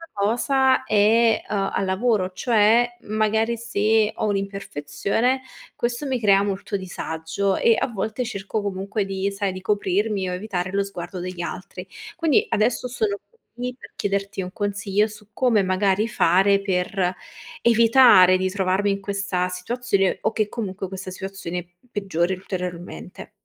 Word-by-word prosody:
cosa 260 +6 +2
è, 220 +2 +4
uhm, 195 -2 0
al 195 - 0
lavoro, 190 -1 +1
cioè, 230 +2 +4 0.2
magari, 220 +2 +1
se 220 -1 +2
ho 215 - -1
un'imperfezione, 200 - -1 0.3
questo 240 +4 -2
mi 260 -2 -1
crea 200 -2 +4
molto 200 0 -2
disagio 185 +1 -2
e 230 - +4
a - - 0
volte 220 +2 -3
cerco 205 -2 -3
comunque 200 +1 -2
di 195 +1 -2
sai, 195 -1 -2
di 185 0 -7
coprirmi 200 0 0
o 180 - -3
evitare 185 -1 -3
lo 200 0 +1
sguardo 180 -1 -7
degli 180 0 -5
altri. 180 +1 -6 0.3
Quindi 340 +6 +2
adesso 230 +3 +1
sono 215 -5 -1 0.4
qui 250 +1 -4
per - - -14
chiederti 200 0 -2
un 180 - -7
consiglio 205 0 0
su 210 -1 -14
come 235 -6 +3
magari 190 +3 +1
fare 195 0 +3
per 185 -1 0 0.5
evitare 230 -5 +7
di 185 0 0
trovarmi 195 +1 +1
in 195 0 -2
questa 195 -2 -1
situazione 195 +1 0
o - - +1
che 215 -2 0
comunque 195 -4 -4
questa 190 -1 -6
situazione 180 -2 -6
peggiori 190 -3 0
ulteriormente. 180 - -6
200 Hz, 145 wpm, -23 LUFS, 185-220 Hz, 0.5 s, evitare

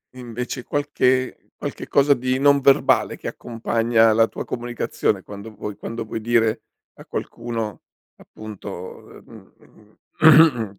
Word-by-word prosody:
invece 125 0 -6
qualche 130 -3 0 0.2
qualche - - -6
cosa 140 +1 +4
di 130 0 -1
non 140 0 +4
verbale 135 0 +3
che - - -8
accompagna 115 -1 +1
la 115 +1 +4
tua - - -7
comunicazione 120 -4 -2
quando 100 +3 -10
vuoi 105 0 -7
quando 115 +2 -6
vuoi 110 0 -5
dire 115 -1 +1 0.3
a - - -15
qualcuno 115 -3 -5 0.3
appunto, 100 -4 -10
ehm, - - -16 0.7
mhmm, 150 -11 +6
120 Hz, 120 wpm, -22 LUFS, 110-130 Hz, 0.7 s, mhmm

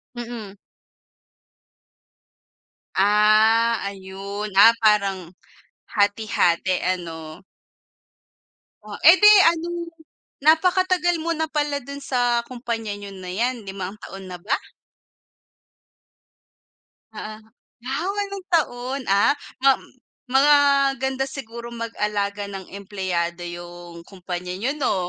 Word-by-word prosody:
Mm. 230 -4 -7 2.4
Ah, 215 +3 +4
ayun. 195 +1 -7
Ah, 205 +4 +9
parang 195 -5 +1 0.6
hati-hati, 205 -3 +1
ano? 165 -3 -4 1.4
Oh, 210 -1 -8
eh 335 - +10
di 420 - +9 0.2
ano, 335 0 -5 0.8
napakatagal 355 +2 +3
mo 335 - -1
na 320 0 -1
pala 295 -2 -1
dun 280 +2 -9
sa 245 -3 +1
kumpanya 235 -4 -4
nyo 200 -1 -9
na 185 -1 -8
'yan. 235 +4 -1
Limang 195 0 -6
taon 195 0 -9
na 180 -1 -7
ba? 205 - 0 2.6
Oo, 215 0 -7 0.5
ah, 275 +8 -2
walong 400 -2 -4
taon? 270 -5 0
Ah 200 +6 +3 0.3
mam 270 -1 +4 0.5
maganda 275 -1 +3
siguro 235 -3 -8
mag-alaga 210 -3 -3
ng 195 -1 -7
empleyado 180 -4 -3
'yung 175 0 -9
kumpanya 180 0 -7
niyo 235 +8 -1
'no? 295 -3 0
215 Hz, 95 wpm, -22 LUFS, 195-270 Hz, 2.6 s, eh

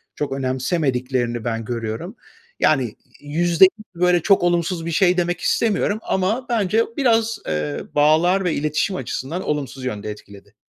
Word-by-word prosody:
çok 145 -2 -3
önemsemediklerini 130 -3 -1
ben 115 -1 -3
görüyorum. 115 - -4 0.4
Yani 130 -8 +2 0.2
yüzde... 165 +4 +4 0.3
Böyle 180 0 +3
çok 195 +1 +3
olumsuz 175 -1 0
bir 170 - -3
şey 180 +2 +3
demek 175 0 0
istemiyorum 210 -1 +1
ama 215 +7 -1
bence 220 -1 +2
biraz, 230 -4 +2
eee, 75 -2 -2 0.2
bağlar 160 +6 +4
ve 175 -3 0
iletişim 155 +6 -1
açısından 135 +4 -4
olumsuz 135 -3 -3
yönde 105 -4 -4
etkiledi. 100 -1 -14
160 Hz, 135 wpm, -21 LUFS, 130-185 Hz, 0.4 s, yüzde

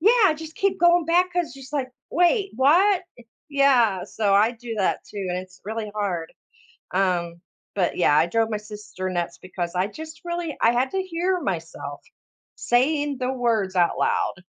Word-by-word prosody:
Yeah, 420 +8 +6
I 315 - +3
just 315 0 -9
keep 385 -1 +1
going 345 -1 +5
back 355 +2 +2
'cause 350 -5 -1
she's 270 0 -12
like, 270 -3 -2 0.2
"Wait, 370 - +2
what?" 350 - +4 0.5
Yeah, 255 -9 +3
so 205 -3 0
I 210 +3 +5
do 235 -1 -7
that 195 -3 0
too, 200 -2 -6
and 180 - -1
it's 185 0 -11
really 220 0 -4
hard. 185 -6 -2 0.6
Um, 175 -2 0 0.3
but 185 -3 0
yeah, 150 -4 +4
I 155 - +5
drove 225 +5 0
my 215 - -1
sister 210 -3 -7
nuts 175 -1 -3
because 180 -1 -5
I 180 +2 +1
just 315 +9 -10
really 345 -3 -3
I 230 - +5
had 250 +2 0
to 385 - 0
hear 365 +1 -1
myself 165 - -5 0.5
saying 285 +3 +1
the 255 0 -1
words 225 -7 0
out 175 -2 +2
loud. - - +1
235 Hz, 180 wpm, -24 LUFS, -, 0.6 s, Yeah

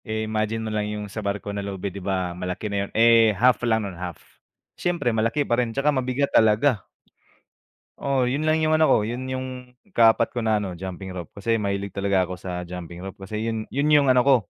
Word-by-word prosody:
Imagine 110 0 -2
mo 110 - -3
lang 105 0 -1
yung 105 0 -4
sa 110 - -4
barko 100 0 -3
na 100 - -3
lubid 100 -1 -5
'di 100 - -7
ba 95 -2 -1
malaki 90 +3 -5
na 100 0 -1
yun - - -24
eh, 115 -2 +5
half 125 +1 +4
lang 110 -3 +1
no'n, 100 - -5
half, 85 -2 -6 0.6
siyempre 170 -9 -1
malaki 115 +6 +1
pa 120 +1 +2
rin 120 - -1
'tsaka 140 +5 +1
mabigat 130 +1 -1
talaga. 110 +2 +4 1.2
Oo, 135 -2 +1
yun 145 +5 -1
lang 155 0 +2
yung 155 - +2
ano 155 0 +4
ko, 135 - +5
yun 120 +4 -4
yung 130 0 -3 0.4
ika-4 115 -1 +3
ko 125 - -3
na 110 -2 +1
ano 90 -3 -5
jumping 95 0 -6
rope 90 -3 -7
kasi 115 +3 0
mahilig 100 -1 -2
talaga 100 -1 +1
ako 90 0 -6
sa 90 -1 -5
jumping 90 0 -8
rope 95 0 -8
kasi 105 +3 -5
yun 110 -1 -3
yun 145 +3 0
yung 145 -2 +5
ano 125 -1 +5
ko, 140 0 +6
110 Hz, 215 wpm, -24 LUFS, 95-125 Hz, 1.2 s, ko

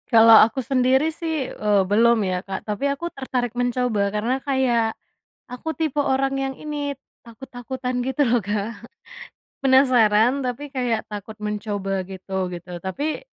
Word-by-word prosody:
Kalau 225 -1 +7
aku 230 +4 -4
sendiri 265 +4 +2
sih, 315 -5 -3
eee, 210 -2 +2
belum 230 +4 +4
ya, 185 -1 -1
Kak. 190 0 -6
Tapi 210 +7 -1
aku 340 +5 -3
tertarik 250 -3 -3
mencoba. 245 -4 0
Karena 225 +6 -1
kayak, 245 -5 +1 0.5
aku 250 +6 -4
tipe 305 -3 0
orang 270 -1 +1
yang 270 0 -2
ini, 290 -2 -4 0.3
takut-takutan 250 +1 -5
gitu 265 +2 +1
loh, 240 -1 +2
Kak. 205 +2 -3 0.8
Penasaran, 255 -2 +4
tapi 255 +3 -4
kayak 245 -4 -1
takut 210 +1 -7
mencoba 205 -2 -3
gitu, 190 0 -4
gitu. 175 0 -7
Tapi, 285 +12 -3
245 Hz, 140 wpm, -23 LUFS, 210-265 Hz, 0.8 s, Kalau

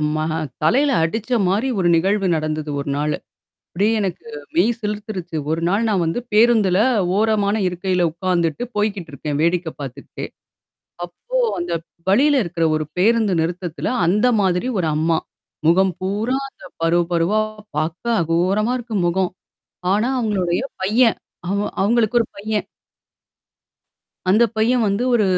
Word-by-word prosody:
ம - - -1
ஹ - - -1 0.3
தலையில 270 - +3
அடிச்ச 225 +8 -3 0.2
மாரி, 210 +8 +1
ஒரு 175 - +2
நிகழ்வு 195 +3 +1
நடந்தது 155 -1 -2
1 140 - -4
நாளு. 150 +1 0 0.6
அப்டியே 210 +5 +2
எனக்கு 185 -3 -3 0.3
மெய் 200 +8 +4
சிலுர்த்துருச்சு. 210 -6 -4
1 165 - -1
நாள் 205 +5 +1
நான் 190 -5 +1
வந்து 165 +8 -1
பேருந்துல 215 -4 +4 0.4
ஓரமான 215 -2 +2
இருக்கையில 180 0 0
உக்காந்துட்டு 170 +2 -1
போய்க்கிட்டு 205 -5 -1
இருக்கேன். 145 +1 -3
வேடிக்கை 170 0 +1
பாத்துக்கிட்டே, 135 0 -7 0.8
அப்போ 475 - -5 0.2
அந்த 175 0 -3 0.4
வழியில 270 +7 +4
இருக்கிற 170 -1 0
ஒரு 155 - -1
பேருந்து 220 0 +3
நிறுத்தத்தில, 175 0 -3 0.2
அந்த 210 +7 +3
மாதிரி 185 +5 +1
ஒரு 165 - 0
அம்மா. 160 +1 +2 0.5
முகம் 190 +2 +4
பூரா 210 +7 -1
அந்த - - -18 0.2
பருவு 170 +1 +3
பருவா 170 +5 +2 0.4
பாக்க 160 +2 -2 0.2
அகோரமா 185 +8 +1
இருக்கு 240 -2 -7
முகம். 185 +1 0 0.6
ஆனா, 215 +5 +2
அவங்களுடைய 195 -3 0 0.2
பையன். 225 +4 +3 0.3
அவன் 200 +1 -1
அவுங்களுக்கு 235 +2 +3
ஒரு 225 - +1
பையன். 215 +1 -2 1.6
அந்த 215 +5 +5
பையன் 230 +2 +2
வந்து 200 +4 0
ஒரு 220 -3 +3
190 Hz, 135 wpm, -20 LUFS, 170-220 Hz, 1.6 s, அந்த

